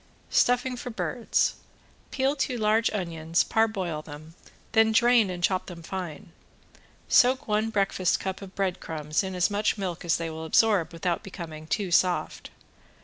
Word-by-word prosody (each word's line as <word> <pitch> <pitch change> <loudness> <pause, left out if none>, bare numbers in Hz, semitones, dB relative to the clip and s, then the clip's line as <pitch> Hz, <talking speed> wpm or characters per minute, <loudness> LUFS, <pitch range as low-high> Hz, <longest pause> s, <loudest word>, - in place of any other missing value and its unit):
~STUFFING 250 +1 +2
FOR 245 - -6
BIRDS~ 235 0 0 0.6
Peel 270 +1 0
two 265 -3 -1
large 220 +1 +2
onions, 170 -4 -1
parboil 195 -8 0
them, 155 +1 -11 0.4
then 220 0 +4
drain 235 -2 +4
and 175 -1 -5
chop 185 +1 +1
them 170 -2 -9
fine. 175 -3 -6 0.8
Soak 260 +3 +4
one 215 +1 +1
breakfast 195 -4 +1
cup 190 0 -4
of 195 -1 -10
bread 190 -2 -1
crumbs 155 -1 -2
in 190 -1 -5
as 180 +3 +1
much 210 +1 0
milk 185 -4 -4
as 170 -1 +1
they 165 -1 -4
will 160 0 -6
absorb 185 -1 +3
without 170 +1 -2
becoming 160 -6 -9
too 195 +1 -2
soft. 180 +1 +1
190 Hz, 155 wpm, -26 LUFS, 170-220 Hz, 0.8 s, then